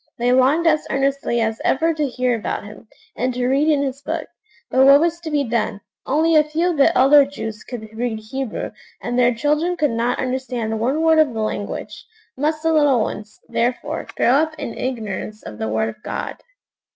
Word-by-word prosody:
They 245 +1 +1
longed 265 +6 +3
as 310 -2 +2
earnestly 275 -3 0
as 220 0 -1
ever 325 +4 +2
to 305 -2 -1
hear 250 -1 0
about 220 - -3
Him, 210 +1 -12 0.3
and 255 +1 -1
to 250 0 -1
read 275 +4 +2
in 295 -3 +3
His 275 0 -4
Book; - - -3 0.5
but 260 - +4
what 275 +1 +8
was 340 +1 0
to 335 -2 -6
be 295 -2 +1
done? 230 -4 -1 0.3
Only 320 +4 +2
a 305 - +6
few 325 +4 0
of 330 - -4
the 275 - +4
elder 280 +2 +7
Jews 225 -6 -6
could 230 -3 -7
read 235 -1 -2
Hebrew, 240 +3 -5 0.3
and 245 +1 -2
their 245 0 +5
children 300 +8 0
could 295 -5 +1
not 235 +2 0
understand 250 -4 -2
one 270 +8 0
word 320 -1 +5
of 290 -7 +3
the 220 - -2
language. 205 -1 -4 0.3
Must 305 +3 -1
the 325 0 +2
little 290 -6 +4
ones, 210 0 -5
therefore, 240 +2 -2
grow - - +3
up 310 +4 +2
in 230 - -5
ignorance 215 -4 -4
of 105 - -9
the 110 - -2
Word 110 +1 0
of 110 - -11
God? - - -5
260 Hz, 200 wpm, -20 LUFS, 230-300 Hz, 0.5 s, what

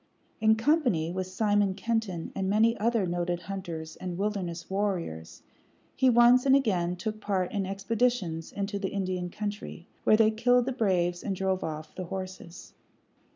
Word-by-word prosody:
In 220 0 +5
company 225 - +2
with 185 0 -3
Simon 205 0 +1
Kenton 205 -5 -2
and 190 -1 -2
many 225 +3 +4
other 225 -2 +1
noted 175 0 -2
hunters 170 -4 -6
and 180 -2 -5
wilderness 190 -4 -3
warriors, 185 - -3 0.5
he 260 -1 +4
once 240 +1 +6
and 270 -1 +5
again 180 -10 +1
took 215 +4 -5
part 190 -4 -1
in 200 -3 -2
expeditions 195 -4 -1
into 200 0 -3
the 195 -1 -2
Indian 185 -2 -2
country, 205 -3 -6 0.2
where 215 - +5
they 220 -1 +5
killed 245 +2 +3
the 265 - -1
braves 180 -7 +1
and 195 - -2
drove 190 0 -1
off 155 0 -5
the 185 - -5
horses. 185 -1 -7
195 Hz, 155 wpm, -28 LUFS, 175-220 Hz, 0.5 s, once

